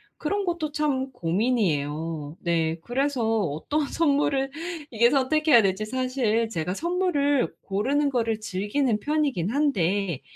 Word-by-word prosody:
그런 400 +6 -2
것도 340 -4 -2
참 280 -3 -1
고민이에요. 165 - -1
네. 165 -1 0
그래서 245 -3 0
어떤 195 - -1
선물을 280 -3 +1 0.4
이게 235 +1 +4
선택해야 280 -1 +4
될지 195 +1 0
사실 255 -2 0
제가 180 -4 -3
선물을 315 - +1
고르는 270 +9 0
거를 230 -3 0
즐기는 215 +5 -1
편이기는 280 - 0
한데 195 - 0
240 Hz, 280 characters per minute, -25 LUFS, 190-285 Hz, 0.4 s, 이게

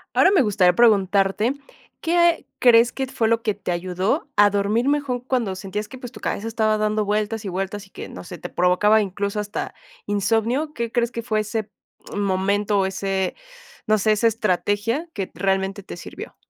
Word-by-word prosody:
Ahora, 375 - +5
me 380 -6 +5
gustaría 195 -6 +3
preguntarte, 205 +1 +3 0.5
¿qué 340 0 +2
crees 235 -1 +6
que 265 - -3
fue 230 -3 0
lo 230 0 +2
que 215 - +1
te 200 -2 -5
ayudó 185 - -1
a 205 0 +6
dormir 205 +5 0
mejor 285 -3 0
cuando 245 -6 -1
sentías 200 +2 -5
que, 260 - -10
pues, 250 -2 -8
tu - - -12
cabeza 220 - -3
estaba 220 -1 +1
dando 215 0 0
vueltas 210 +1 -1
y - - -2
vueltas, 195 +2 -4
y - - -27
que, - - -8
no - - -9
sé, 175 0 -9
te 175 - -7
provocaba 195 +5 +3
incluso 200 +1 -3
hasta 210 0 -4 0.3
insomnio? 225 +9 0
¿Qué 235 -3 -3
crees 235 0 0
que 235 - -4
fue 220 -2 0
ese 215 0 -3 0.5
momento 200 +1 +1
o 190 - +2
ese, 190 0 -2 0.5
no 215 0 +3
sé, 215 +1 +2
esa 215 +2 +2
estrategia 220 - 0
que 195 -2 -3
t - - -19
realmente 195 +1 0
te - - -9
sirvió? 175 - -9
210 Hz, 190 wpm, -22 LUFS, 195-230 Hz, 0.5 s, crees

